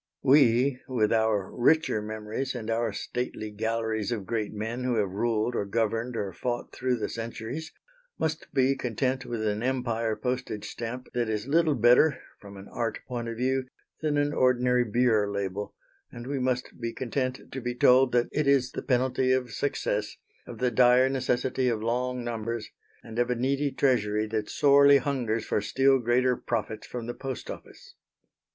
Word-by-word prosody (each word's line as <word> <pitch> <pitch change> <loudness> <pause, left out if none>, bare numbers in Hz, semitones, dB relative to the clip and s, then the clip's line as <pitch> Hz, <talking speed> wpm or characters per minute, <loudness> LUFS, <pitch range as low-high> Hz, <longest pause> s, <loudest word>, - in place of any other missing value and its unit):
We, 130 -1 +4
with 115 -4 +1
our 110 -4 +1
richer 140 -2 +2
memories 110 +5 -4
and 115 -2 -4
our 115 0 0
stately 110 0 -4
galleries 110 0 -2
of 105 -5 -3
great 110 0 -2
men 110 +4 -4
who 125 -1 0
have 100 -4 0
ruled 110 +3 0
or - - 0
governed 115 +3 -1
or 100 -4 -3
fought 120 +5 -4
through 130 -1 0
the 110 - -2
centuries, 115 +7 -6 0.5
must 160 0 -3
be 135 +1 +3
content 130 +1 -2
with 115 -2 -3
an 105 0 -1
Empire 120 -3 -1
postage 125 -4 -3
stamp 120 +2 -6
that 120 -2 0
is 105 0 -2
little 155 +1 +3
better, 125 +6 +5 0.2
from 100 -1 -12
an 95 - -11
art 115 -1 -2
point 120 -2 -4
of 115 -1 -5
view, 130 +1 0 0.3
than 150 -2 0
an 145 0 +1
ordinary 125 -2 +3
beer 110 -2 +2
label, 100 0 -4 0.4
and 120 - -9
we 140 +1 -2
must 125 -1 -2
be 115 0 -3
content 130 +1 -3
to 135 - -5
be 120 0 -3
told 125 +1 +5
that 120 0 +2
it 150 -1 0
is 135 -2 +3
the - - -5
penalty 130 0 +1
of 130 -2 0
success, 105 -5 -2 0.3
of 120 - -8
the 125 +1 +1
dire 125 +2 +5
necessity 130 -1 0
of 115 -2 -1
long 125 +2 -1
numbers, 115 -1 -4 0.3
and 115 +1 -6
of 120 0 +2
a 125 - +1
needy 135 +4 0
Treasury 110 -6 +1
that 110 -1 -3
sorely 140 -1 +6
hungers 125 -5 -1
for - - 0
still 135 +5 +3
greater 125 +1 +2
profits 110 -2 -4
from 120 -2 -6
the 120 - -4
Post 130 -2 -6
Office. - - -12
120 Hz, 175 wpm, -27 LUFS, 110-130 Hz, 0.5 s, sorely